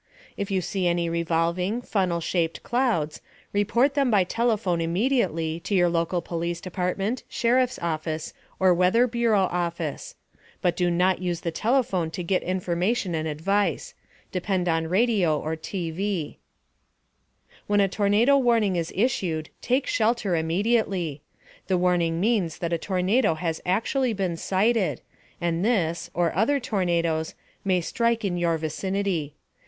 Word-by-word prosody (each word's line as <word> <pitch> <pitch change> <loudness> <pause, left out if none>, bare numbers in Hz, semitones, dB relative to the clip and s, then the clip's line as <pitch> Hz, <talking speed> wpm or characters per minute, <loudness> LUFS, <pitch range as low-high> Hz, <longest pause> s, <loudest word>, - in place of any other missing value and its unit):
If 200 - -4
you 190 -2 +1
see 185 +1 -1
any 170 -1 0
revolving, 170 +6 0
funnel 185 -7 0
shaped 165 -1 -1
clouds, 225 - 0 0.3
report 235 +7 +2
them 275 -2 +2
by 205 -4 +4
telephone 210 -4 0
immediately 170 - 0
to 195 +4 -2
your 175 -2 +4
local 170 +1 0
police 170 0 -3
department, 185 +6 -2
sheriff's 250 +1 +1
office 155 -1 -3 0.3
or 185 -1 +5
Weather 185 +7 +4
Bureau 235 -4 +2
office. 175 - -3 0.4
But 175 -2 +1
do 180 -1 +1
not 180 +1 +2
use 175 -2 -2
the 170 - -2 0.4
phone 175 -4 -1
to 180 +2 -5
get 185 +2 +1
information 185 +2 -1
and 160 0 -1
advice 195 - -1 0.4
depend 185 -1 -1
on 165 -1 +1
radio 185 -5 +2
or 160 +1 -3
TV. 175 +1 -3 0.6
* - - -33
When 205 0 +2
a 200 - +4
tornado 210 +8 +3
warning 225 -7 +2
is 165 -1 -2
issued, 180 -8 0
take 255 +2 +1
shelter 220 -4 +1
immediately. 175 -2 0 0.5
The 185 - +2
warning 175 -2 +1
means 195 -5 +1
that 170 -1 -2
a 170 - 0
tornado 190 +2 +1
has 165 0 -3
actually 230 +6 +1
been 190 -4 -1
sighted, 195 +4 +1 0.4
and 170 0 -1
this 180 -8 0
(or 170 -1 +1
other 235 +9 +2
tornadoes) 170 -9 -1 0.3
may 185 -2 +2
strike 230 +5 0
in 185 -3 -1
your 170 -1 +1
vicinity. 165 -1 -2
180 Hz, 140 wpm, -25 LUFS, 170-215 Hz, 0.6 s, or